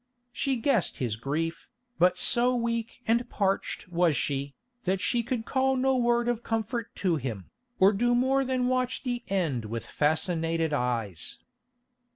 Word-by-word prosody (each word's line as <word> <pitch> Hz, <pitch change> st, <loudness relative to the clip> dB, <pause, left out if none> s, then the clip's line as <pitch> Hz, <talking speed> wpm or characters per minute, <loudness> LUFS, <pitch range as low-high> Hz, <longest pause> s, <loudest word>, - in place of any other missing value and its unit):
She 270 Hz, +2 st, 0 dB
guessed 235 Hz, -, +1 dB
his 120 Hz, -5 st, -1 dB
grief, 155 Hz, +8 st, -3 dB, 0.3 s
but 180 Hz, +1 st, +4 dB
so 245 Hz, +5 st, +4 dB
weak 230 Hz, 0 st, -2 dB
and 235 Hz, +2 st, +1 dB
parched 195 Hz, -2 st, -1 dB
was 170 Hz, -4 st, +2 dB
she, 140 Hz, +1 st, -2 dB, 0.3 s
that 190 Hz, +1 st, +1 dB
she 235 Hz, +5 st, +1 dB
could 235 Hz, -1 st, -3 dB
call 265 Hz, 0 st, +1 dB
no 265 Hz, +1 st, +2 dB
word 240 Hz, -1 st, +2 dB
of 240 Hz, -1 st, 0 dB
comfort 225 Hz, +1 st, -3 dB
to 180 Hz, -4 st, +1 dB
him, 115 Hz, -, -5 dB, 0.3 s
or 195 Hz, +2 st, +6 dB
do 240 Hz, +4 st, +2 dB
more 265 Hz, +2 st, +2 dB
than 255 Hz, -1 st, 0 dB
watch 255 Hz, 0 st, 0 dB
the 245 Hz, -2 st, -2 dB
end 165 Hz, -, -1 dB
with 115 Hz, +1 st, -5 dB
fascinated 165 Hz, +1 st, 0 dB
eyes. 115 Hz, -, -1 dB
200 Hz, 155 wpm, -28 LUFS, 155-245 Hz, 0.3 s, or